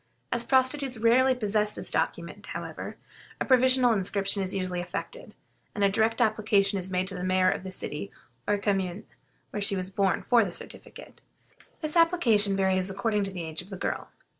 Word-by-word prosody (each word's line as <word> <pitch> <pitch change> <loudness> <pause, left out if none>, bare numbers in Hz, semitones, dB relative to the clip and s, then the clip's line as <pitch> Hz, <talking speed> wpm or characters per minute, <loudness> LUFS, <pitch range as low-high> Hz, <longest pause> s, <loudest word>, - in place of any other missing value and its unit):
As 240 -1 +2
prostitutes 260 0 +2
rarely 250 +4 +4
possess 210 -2 0
this - - -5
document, - - -2
however, - - -6 0.4
a - - -1
provisional 255 -1 +4
inscription 200 0 +1
is 190 -1 -2
usually 185 -2 -2
effected, 465 - -7 0.4
and 205 - 0
a 200 - +5
direct 225 +2 +1
application 210 -3 +2
is 185 0 -5
made 185 0 -1
to - - -4
the 180 -1 -5
mayor 185 0 +3
of - - -3
the 190 0 -7
city 185 +1 -4 0.4
or 205 - +2
commune 195 -1 -2 0.5
where 205 - -4
she 200 0 +2
was 185 0 -3
born 195 -1 0
for 240 -2 +5
the 190 - -4
certificate. - - -7 0.6
This 310 0 -3
application 240 - +3
varies 190 -1 +1
according 200 +1 -1
to 195 - -4
the 180 -3 -5
age 160 0 -3
of 180 - -15
the 195 - -7
girl. - - -3
200 Hz, 185 wpm, -27 LUFS, 190-230 Hz, 0.6 s, a